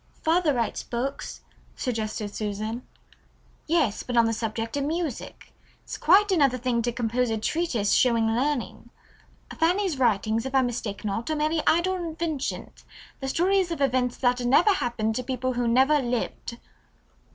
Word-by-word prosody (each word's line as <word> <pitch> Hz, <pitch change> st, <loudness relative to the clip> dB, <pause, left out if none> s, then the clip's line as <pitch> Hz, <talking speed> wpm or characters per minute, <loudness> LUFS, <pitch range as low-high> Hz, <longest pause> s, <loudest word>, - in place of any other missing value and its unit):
"Father 325 Hz, 0 st, +3 dB
writes 235 Hz, -4 st, -1 dB
books," 255 Hz, +4 st, -4 dB, 0.3 s
suggested 215 Hz, -4 st, -3 dB
Susan. 215 Hz, +3 st, -3 dB, 0.9 s
"Yes, 305 Hz, -10 st, +1 dB
but 245 Hz, -1 st, -3 dB
on 230 Hz, -, +6 dB
the 225 Hz, -, 0 dB
subject 225 Hz, +2 st, -3 dB
of 285 Hz, -, -1 dB
music. 315 Hz, -3 st, -4 dB, 0.3 s
It's -, -, -6 dB
quite 400 Hz, +5 st, +4 dB
another 280 Hz, -8 st, +3 dB
thing 245 Hz, -1 st, 0 dB
to 240 Hz, +1 st, -1 dB
compose 240 Hz, +1 st, -1 dB
a 225 Hz, -, 0 dB
treatise 240 Hz, -4 st, -1 dB
showing 230 Hz, -3 st, +3 dB
learning. 240 Hz, -1 st, -1 dB, 0.7 s
Fanny's 350 Hz, -2 st, +1 dB
writings, 225 Hz, -2 st, +1 dB
if 265 Hz, -, -5 dB
I 265 Hz, -, +5 dB
mistake 230 Hz, -5 st, -4 dB
not, 220 Hz, +5 st, -2 dB
are 310 Hz, -, 0 dB
merely 305 Hz, +1 st, 0 dB
idle 370 Hz, +3 st, +3 dB
inventions, 325 Hz, -4 st, -4 dB, 0.4 s
the 270 Hz, -, -4 dB
stories 370 Hz, +5 st, +2 dB
of 335 Hz, -3 st, -4 dB
events 255 Hz, -3 st, +1 dB
that 245 Hz, 0 st, +1 dB
never 285 Hz, -, +5 dB
happened 240 Hz, -, -1 dB
to 255 Hz, -, -2 dB
people 255 Hz, 0 st, -2 dB
who 245 Hz, -1 st, -1 dB
never 265 Hz, +6 st, +4 dB
lived." 240 Hz, -1 st, -3 dB
250 Hz, 150 wpm, -26 LUFS, 230-310 Hz, 0.9 s, on